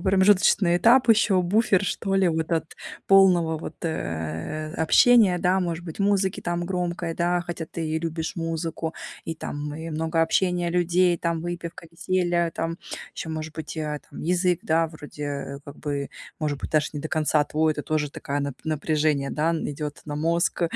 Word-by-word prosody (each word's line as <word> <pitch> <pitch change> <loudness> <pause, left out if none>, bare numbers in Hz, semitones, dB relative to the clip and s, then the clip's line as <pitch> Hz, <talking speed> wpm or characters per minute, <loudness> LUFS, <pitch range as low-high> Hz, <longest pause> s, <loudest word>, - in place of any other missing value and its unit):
промежуточный 190 -1 +4
этап, 235 +6 +5
ещё 210 -4 +4
буфер, 200 +1 +3
что 195 0 -1
ли, 190 -2 +4
вот 160 +1 -1
от 160 -1 -1 0.3
полного 180 -5 +5
вот, - - -7
э, 85 - -3
общения, 195 +3 +5
да, 180 +2 +2
может 170 -1 -2
быть, 160 +1 -8
музыки 195 -1 +1
там 175 0 -2
громкой, 175 -2 -2
да, 175 +1 +1
хотя 170 -2 -5
ты 165 -2 -4
и 160 +1 0
любишь 160 +1 -4
музыку, 165 0 -3 0.3
и 165 - -3
там 150 -1 -5
и 160 +1 -6
много 160 +1 0
общения 175 0 +1
людей, 175 0 +2
там 170 -1 -1
выпивка, 170 -1 -6
веселье, 175 -1 0
там 165 +1 -3 0.4
ещё 160 - -5
может 155 0 -5
быть 160 0 -6
и, - - -2
а, 150 -1 -3
там - - -9
язык, 180 +1 +1
да, 165 +1 +2
вроде, 150 -2 -9
э, 140 -1 -4
как 145 - -10
бы, 140 -2 -3 0.3
может 145 -2 -2
быть, - - -5
даже 150 -1 +2
не 145 - -4
до 155 - -5
конца 155 -1 +2
твой, 155 +1 +1
это 150 - -5
тоже 150 -2 -1
такая 140 +1 -3
нап 140 -2 -3
напряжение, 155 -2 0
да, 160 +2 +1
идёт 150 -2 -4
на 150 -1 -5
мозг, 170 +3 0
165 Hz, 180 wpm, -25 LUFS, 155-180 Hz, 0.4 s, этап